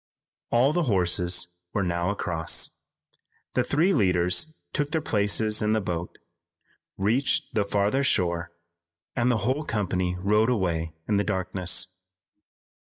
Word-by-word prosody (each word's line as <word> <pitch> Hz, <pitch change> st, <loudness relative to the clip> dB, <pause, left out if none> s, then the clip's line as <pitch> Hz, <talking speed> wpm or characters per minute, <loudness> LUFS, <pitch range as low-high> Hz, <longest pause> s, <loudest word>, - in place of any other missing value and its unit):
All 130 Hz, +5 st, +3 dB
the 175 Hz, -1 st, +1 dB
horses 90 Hz, -2 st, +2 dB, 0.3 s
were 100 Hz, -, 0 dB
now 85 Hz, 0 st, -1 dB
across. 85 Hz, -5 st, +2 dB, 0.8 s
The -, -, +2 dB
three 170 Hz, +7 st, +2 dB
leaders 95 Hz, -, +2 dB, 0.2 s
took 145 Hz, -1 st, -1 dB
their 160 Hz, -, 0 dB
places 105 Hz, -4 st, +1 dB
in 105 Hz, 0 st, +1 dB
the 110 Hz, -, +2 dB
boat, 85 Hz, -3 st, -4 dB, 0.8 s
reached 115 Hz, +8 st, 0 dB
the 105 Hz, -2 st, +1 dB
farther 105 Hz, +7 st, +1 dB
shore 85 Hz, -7 st, 0 dB, 0.6 s
and 120 Hz, 0 st, +1 dB
the 120 Hz, -, +2 dB
whole 135 Hz, +5 st, 0 dB
company 95 Hz, -7 st, -1 dB
rode 105 Hz, +4 st, +2 dB
away 85 Hz, -8 st, -1 dB
in 105 Hz, -, +1 dB
the 100 Hz, -, +2 dB
darkness. 95 Hz, -3 st, -1 dB
100 Hz, 130 wpm, -26 LUFS, 90-120 Hz, 0.8 s, All